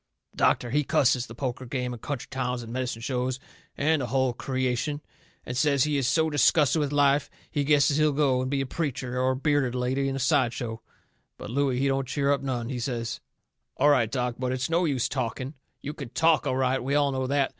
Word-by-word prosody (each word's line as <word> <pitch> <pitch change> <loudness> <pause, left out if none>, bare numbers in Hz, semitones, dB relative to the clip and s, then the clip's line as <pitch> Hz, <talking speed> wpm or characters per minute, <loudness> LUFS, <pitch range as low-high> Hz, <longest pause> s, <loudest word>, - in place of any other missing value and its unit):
The - - -25
doctor, 120 - +2
he 150 +3 +2
cusses 130 -3 +2
the 115 - -10
poker 130 0 -4
game 125 0 -3
and 115 - -9
country 135 -5 -4
towns 125 -2 -2
and 115 0 -8
medicine 125 -3 -3
shows 125 0 -1 0.4
and 155 +1 +2
the 125 - -2
hull 130 +1 +1
creation 130 +3 -2 0.5
and 125 - -5
says 140 0 +3
he 150 -1 0
is 135 -4 +1
so 160 +3 +2
disgusted 150 +1 +3
with 145 -2 -1
life 145 -1 +3 0.2
he 145 -3 0
guesses 140 0 +3
he'll 155 -1 +3
go 135 -3 +2
and 130 - -2
be 140 0 0
a - - -1
preacher 130 -3 -3
or 130 0 +2
a - - -3
bearded 140 -2 +1
lady 130 +2 0
in 135 - -3
a - - -2
sideshow. 120 -4 0 0.6
But - - -8
Looey, 135 -1 +1
he 135 +2 +1
don't 135 -1 0
cheer 140 +1 0
up 140 - +1
none. 125 -4 -3
He 130 -2 -3
says: 115 -1 -3 0.6
"All 145 +2 +4
right, 125 -7 +3
Doc, 125 -1 -2
but 125 -1 -1
it's 130 +4 -2
no 170 +2 +2
use 135 -6 0
talking. 130 +1 -3 0.3
You 145 - -4
can 140 -5 -8
TALK 165 +4 +2
all 130 - 0
right. 130 -1 +1
We 140 +3 0
all 145 -1 +3
know 130 -1 -2
that. 140 0 +1
130 Hz, 225 wpm, -26 LUFS, 125-145 Hz, 0.6 s, All